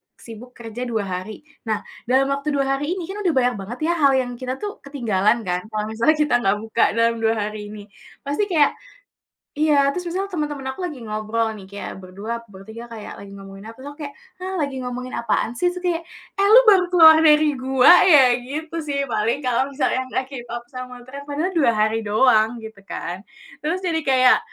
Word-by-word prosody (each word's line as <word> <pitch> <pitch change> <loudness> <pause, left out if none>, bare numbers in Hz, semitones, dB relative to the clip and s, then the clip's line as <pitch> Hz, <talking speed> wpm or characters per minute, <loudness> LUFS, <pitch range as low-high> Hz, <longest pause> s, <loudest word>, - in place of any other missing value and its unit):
sibuk 235 +2 -12
kerja 235 +1 -7
2 220 -3 -1
hari. 185 +3 -6 0.3
Nah, 215 -1 -1 0.3
dalam 265 +2 +3
waktu 280 +1 -2
2 275 -1 +1
hari 295 +6 -2
ini, 365 - -5
kan, 410 - -6
udah 345 - +3
banyak 250 -1 +2
banget, 220 +6 -7
ya - - +2
hal 280 -2 +5
yang 250 -2 0
kita 255 0 -3
tuh 410 -1 -5
ketinggalan 230 -5 0
kan, 180 +1 -2
kalau 210 0 -2
misalnya 235 +8 +2
kita 295 -5 +1
enggak 200 -2 +1
buka 225 0 +1
dalam 230 0 +2
2 225 0 +1
hari 210 0 -4
ini. 210 0 -9 0.4
Pasti 290 +9 -1
kayak 315 -7 +3 0.9
iya, 295 -2 +3
terus 360 +2 -5
misalnya 390 +3 -3
teman-teman 295 -4 -3
aku 265 - -11
lagi 300 -6 -7
ngobrol, 215 +1 -2
nih, 195 - -12
kayak 200 - -7
berdua, 210 +6 -6
bertiga, 220 +5 -10
kayak 215 -2 -8
lagi 200 0 -11
ngomongin 195 0 -11
apa, - - -8
terus 275 - -8
aku 290 - -20
kayak, 285 - -8 0.3
"Hah, 375 +1 -5
lagi 280 -2 -2
ngomongin 250 +1 -5
apaan, 235 -1 -1
sih?" 360 - +2
su 360 - -6
kayak, 350 -2 -1 0.3
"Eh, 395 - +2
lu - - +10
baru 380 -3 +6
keluar 320 -3 +8
dari 300 -2 +4
gua, 260 +3 +5
ya!" 270 -9 +6
gitu, 310 +6 -6
sih, 280 -1 -1
paling 225 +4 0
kalau 255 +2 +1
misalnya 260 -2 0
enggak 260 - -1
keep 255 -4 -7
up 240 0 -5
sama 250 -1 -8
tren, 280 +2 -8
padahal 310 +6 -2
2 275 -7 +4
hari 215 +1 +1
doang, 220 +1 +3
gitu, 220 -2 -10
kan. 185 0 -6 0.4
Terus, 335 +5 -1
jadi 325 -2 0
kayak, 255 -1 +5
255 Hz, 205 wpm, -21 LUFS, 220-295 Hz, 0.9 s, lu